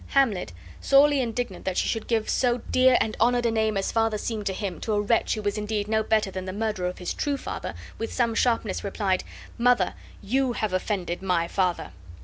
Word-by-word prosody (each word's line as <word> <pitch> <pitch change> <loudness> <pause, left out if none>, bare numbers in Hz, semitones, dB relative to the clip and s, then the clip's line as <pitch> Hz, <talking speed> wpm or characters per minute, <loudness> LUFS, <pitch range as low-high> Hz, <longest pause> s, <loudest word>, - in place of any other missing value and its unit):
Hamlet, 225 - +1 0.3
sorely 280 0 +5
indignant 235 -5 -3
that 190 -1 -2
she - - +1
should 225 - -2
give 225 -2 0
so 245 -2 +2
dear 255 -1 +5
and 215 - -1
honored 240 +1 +3
a 230 - +3
name 220 -2 +1
as 195 - -1
father 225 -1 +1
seemed 215 -1 -3
to - - +1
him 185 -4 -4
to 220 - -1
a 205 - +2
wretch 220 +3 +1
who 215 - -5
was 205 +1 -1
indeed 210 -1 -2
no 220 0 +2
better 215 -2 +1
than 185 0 -5
the 185 - -4
murderer 210 -3 -1
of 180 - -5
his 180 - -3
true 285 -2 -1
father, - - -5 0.2
with 225 - -3
some 235 -2 +1
sharpness 230 -3 0
replied: 195 -2 0 0.4
"Mother, 240 -6 +3 0.3
YOU 255 +4 +1
have 215 -3 -2
much 185 0 0
offended 180 -4 -3
MY 180 -3 +1
FATHER." 180 - -1
215 Hz, 215 wpm, -26 LUFS, 195-235 Hz, 0.4 s, sorely